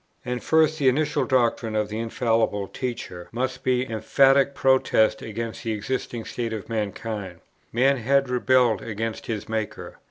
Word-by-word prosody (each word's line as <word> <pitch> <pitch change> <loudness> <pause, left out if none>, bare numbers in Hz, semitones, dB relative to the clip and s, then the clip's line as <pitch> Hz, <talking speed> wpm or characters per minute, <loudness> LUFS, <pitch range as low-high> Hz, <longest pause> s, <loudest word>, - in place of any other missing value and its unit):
And 125 0 -3
first, 160 0 +3
the 135 -2 +5
initial 150 +3 +1
doctrine 120 -4 +1
of 105 -1 0
the 110 +1 -4
infallible 115 -3 0
teacher 115 -9 -6
must 125 +2 -3
be 130 0 +1
an 130 - -10
emphatic 135 +5 +3
protest 120 -5 +3
against 115 +1 -5
the 115 -2 -1
existing 115 +1 -4
state 115 -2 -4
of 105 -3 -6
mankind. 105 -4 -4 0.3
Man 135 +4 +3
had 135 +3 +2
rebelled 125 -2 +3
against 110 0 -4
his 110 -3 -4
Maker. 110 -2 -4
115 Hz, 155 wpm, -24 LUFS, 110-130 Hz, 0.3 s, the